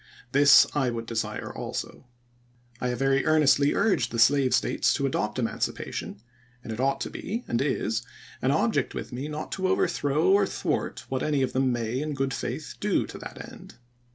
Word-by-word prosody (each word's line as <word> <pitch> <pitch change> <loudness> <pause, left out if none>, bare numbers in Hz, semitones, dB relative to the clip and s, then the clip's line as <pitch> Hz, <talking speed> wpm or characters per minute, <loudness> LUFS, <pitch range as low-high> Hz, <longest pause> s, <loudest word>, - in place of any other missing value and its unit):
This 140 0 +7
I 135 -4 +1
would 115 -1 -4
de 115 - -7
sire 115 - -3
also. - - -6 0.7
I 125 - -1
have 125 0 -2
very 135 +1 +2
earnestly 145 -2 +4
urged 170 - +2
the 115 - -3
slave 130 +3 +4
States 125 - +1
to 140 - -1
adopt 105 -5 -1
emancipation; 115 -3 -3 0.4
and 110 - -5
it 110 - -7
ought 135 +1 +1
to - - -3
be, 230 +6 -4
and 120 - 0
is, 115 -5 0 0.4
an - - +1
object - - +1
with - - -6
me 130 +4 -4
not 150 0 -6
to 190 -1 -1
overthrow 145 -3 +1
or 200 0 +4
thwart - - -3
what 130 -1 -2
any 145 -3 +1
of 130 - -2
them 130 0 +2
may, 120 +2 -2
in 150 -1 -3
good 135 -1 -1
faith, - - -5
do - - +1
to - - -9
that - - -9
end. - - -13
135 Hz, 190 wpm, -26 LUFS, 120-145 Hz, 0.7 s, This